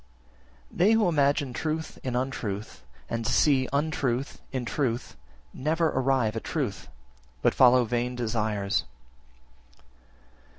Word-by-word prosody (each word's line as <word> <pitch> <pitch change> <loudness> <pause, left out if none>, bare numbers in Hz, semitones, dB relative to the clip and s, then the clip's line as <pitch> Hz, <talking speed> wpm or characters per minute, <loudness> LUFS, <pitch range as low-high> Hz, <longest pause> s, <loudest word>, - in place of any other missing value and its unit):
11. - - -14
They 190 +5 +5
who 225 -3 +3
imagine 145 -4 +2
truth 160 +4 -3
in 125 -2 -2
untruth, 110 -5 -3 0.3
and 115 0 -3
see 130 +1 +3
untruth 140 -3 -1
in 130 -3 -3
truth, 120 -2 -2 0.4
never 160 +4 +1
arrive 130 -5 +1
at 115 - -4
truth, 135 -11 -3 0.6
but - - +4
follow 125 -1 +6
vain 120 +2 -1
desires. 110 -4 -1
130 Hz, 115 wpm, -27 LUFS, 115-145 Hz, 0.6 s, follow